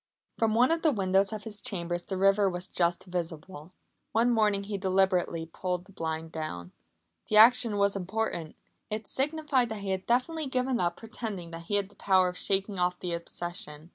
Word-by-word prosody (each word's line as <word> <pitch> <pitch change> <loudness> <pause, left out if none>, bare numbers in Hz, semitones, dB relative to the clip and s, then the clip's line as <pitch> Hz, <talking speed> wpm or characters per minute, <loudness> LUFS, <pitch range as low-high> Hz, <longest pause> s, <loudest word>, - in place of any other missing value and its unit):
From 220 -1 +2
one 250 +5 +4
of 330 0 +1
the 315 - +4
windows 195 -3 +2
of 215 -1 -5
his 210 -1 -7
chambers 175 -7 -2
the 190 - -4
river 195 +1 +4
was 180 0 -4
just 175 -1 0
visible. 170 -2 -5 0.4
One 235 +2 +3
morning 210 -3 +2
he 200 0 -4
deliberately 185 -3 +1
pulled 180 +2 -4
the 200 - -17
blind 160 -3 -4
down. 90 - -5 0.6
The 215 - +2
action 230 -1 +7
was 200 0 +2
important. 190 -4 -3 0.3
It 215 0 -4
signified 280 -3 +1
that 220 -2 -5
he 195 -1 -3
had 190 0 -3
definitely 280 +6 0
given 255 -1 0
up 175 0 0
pretending 215 -6 -6
that 165 0 -8
he 205 - 0
had 200 -1 0
the 205 - -17
power 185 -2 +3
of 180 - -8
shaking 195 0 0
off 180 0 0
the 180 -2 -3
obsession. 170 -1 -5
195 Hz, 190 wpm, -29 LUFS, 175-220 Hz, 0.6 s, action